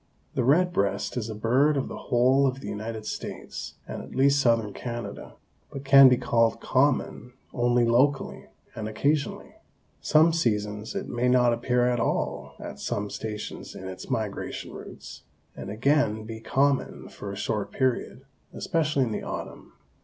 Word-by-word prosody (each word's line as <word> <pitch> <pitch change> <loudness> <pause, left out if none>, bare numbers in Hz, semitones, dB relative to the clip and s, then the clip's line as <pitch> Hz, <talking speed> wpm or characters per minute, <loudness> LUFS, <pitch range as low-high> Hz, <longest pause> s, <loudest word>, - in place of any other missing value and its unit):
The 130 - 0
red 175 +8 +3
breast 100 -1 0
is 115 -3 -3
a 110 - -5
bird 130 +7 +2
of 135 - -1
the - - -7
whole 130 +3 +4
of 130 0 -2
the - - -8
United 110 +1 -5
States - - -6
and - - -5
at - - -11
least 140 +2 +4
southern 115 -5 +2
Canada, 120 -1 -6 0.3
but 135 0 -8
can 135 -1 +9
be 125 - +4
called 115 -2 +2
common 130 -3 0 0.2
only 120 0 +2
locally 130 +4 +1 0.3
and 110 0 -5
occasionally. 140 +7 -1 0.4
Some 160 +2 +4
seasons 105 -8 -1
it - - -3
may 120 +1 -1
not 125 -1 +4
appear 125 +1 +1
at 125 -1 +1
all 115 - -2
at - - -8
some 100 0 -3
stations 105 -1 -6
in 95 - -7
its 95 +4 -8
migration 110 -6 -3
routes, - - -10 0.3
and - - -7
again 110 -1 +1
be 110 0 -7
common 135 +4 0
for 100 - -8
a - - -6
short 105 0 -2
period, 130 0 -1 0.3
especially 155 -4 0
in 120 - -2
the - - -3
autumn. - - -7
120 Hz, 160 wpm, -26 LUFS, 110-135 Hz, 0.4 s, can